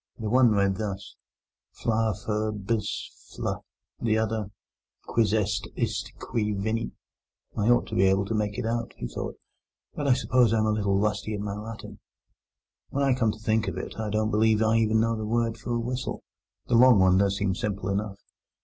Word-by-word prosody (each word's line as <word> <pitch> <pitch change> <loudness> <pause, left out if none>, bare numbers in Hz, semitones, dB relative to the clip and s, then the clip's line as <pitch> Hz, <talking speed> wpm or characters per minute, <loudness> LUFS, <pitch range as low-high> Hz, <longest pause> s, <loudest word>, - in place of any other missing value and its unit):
The 110 -2 -3
one 125 -1 +6
read 100 -2 +2
thus: 100 -2 -5 0.6
FLA 110 -2 0
FUR 110 0 0
BIS 105 +1 -3 0.2
FLE - - -3 0.4
The 110 -2 +2
other: 110 -1 0 0.6
QUIS 115 -3 +1
EST 105 -1 0
ISTE 115 0 -2
QUI 105 -2 -2
VENIT 110 +3 -2 0.6
"I 105 +3 +1
ought 120 - +4
to - - -6
be 95 - +4
able 95 +1 +3
to 110 - -3
make 105 -1 -1
it - - -2
out," 115 0 -2
he - - -4
thought; - - -5 0.6
"but 145 - -3
I 135 - +6
suppose 125 -3 +3
I - - +3
am 110 - +2
a 110 - +2
little 100 -2 +1
rusty 105 +1 -1
in 100 - -4
my 100 -1 -3
Latin. 110 +2 -8 0.9
When 140 - -1
I 135 -1 +4
come 115 -4 +2
to 105 - -9
think 110 0 +1
of - - -3
it, - - -6
I 110 -1 -2
don't 110 +1 0
believe 110 0 +3
I 110 +1 +3
even 110 0 +3
know 115 0 +1
the 110 - -4
word 115 +1 0
for 120 +1 -3
a - - 0
whistle. 125 +2 -3 0.4
The - - -3
long 125 0 +7
one 95 -1 +5
does 100 0 +2
seem 100 -2 0
simple 100 -1 -3
enough. 100 0 -2
110 Hz, 200 wpm, -27 LUFS, 105-115 Hz, 0.9 s, long